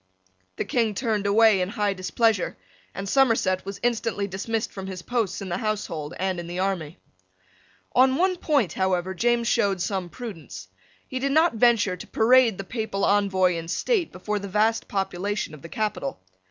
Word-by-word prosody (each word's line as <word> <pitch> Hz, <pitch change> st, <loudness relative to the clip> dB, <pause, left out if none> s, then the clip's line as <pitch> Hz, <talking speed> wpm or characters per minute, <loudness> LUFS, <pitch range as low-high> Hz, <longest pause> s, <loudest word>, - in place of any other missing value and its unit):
The -, -, -3 dB
King 225 Hz, -4 st, 0 dB
turned 215 Hz, -3 st, -1 dB
away 215 Hz, -1 st, +5 dB
in 180 Hz, -, -1 dB
high 210 Hz, -2 st, 0 dB
displeasure, 200 Hz, +1 st, 0 dB, 0.4 s
and 195 Hz, +1 st, -5 dB
Somerset 225 Hz, -7 st, +2 dB
was 195 Hz, -, -5 dB
instantly 230 Hz, -3 st, 0 dB
dismissed 205 Hz, +3 st, -3 dB
from 190 Hz, -1 st, -7 dB
his 185 Hz, -2 st, -7 dB
posts 230 Hz, -5 st, -1 dB
in 190 Hz, -, -6 dB
the 175 Hz, +2 st, -2 dB
household 175 Hz, -8 st, -3 dB
and 185 Hz, -1 st, -1 dB
in 170 Hz, -, -6 dB
the 175 Hz, +1 st, -5 dB
army. 185 Hz, -5 st, -2 dB, 1.0 s
On 260 Hz, +1 st, +5 dB
one 370 Hz, +3 st, +2 dB
point, 275 Hz, -, +1 dB
however, 190 Hz, -1 st, 0 dB
James 235 Hz, +4 st, +1 dB
showed 200 Hz, -6 st, +2 dB
some 185 Hz, -1 st, -2 dB
prudence. 160 Hz, -, -9 dB, 0.4 s
He 260 Hz, -, -4 dB
did 275 Hz, +1 st, 0 dB
not 320 Hz, 0 st, +4 dB
venture 225 Hz, -5 st, +3 dB
to -, -, -10 dB
parade 235 Hz, -2 st, +4 dB
the 195 Hz, -, -4 dB
Papal 215 Hz, -1 st, -2 dB
Envoy 190 Hz, -3 st, +3 dB
in 165 Hz, 0 st, -5 dB
state 380 Hz, -, 0 dB
before 210 Hz, +3 st, -3 dB
the 200 Hz, -, -6 dB
vast 215 Hz, +3 st, +1 dB
population 195 Hz, -1 st, -2 dB
of 150 Hz, -, -11 dB
the 165 Hz, -, -10 dB
capital. 175 Hz, -, -3 dB
200 Hz, 175 wpm, -25 LUFS, 185-230 Hz, 1.0 s, away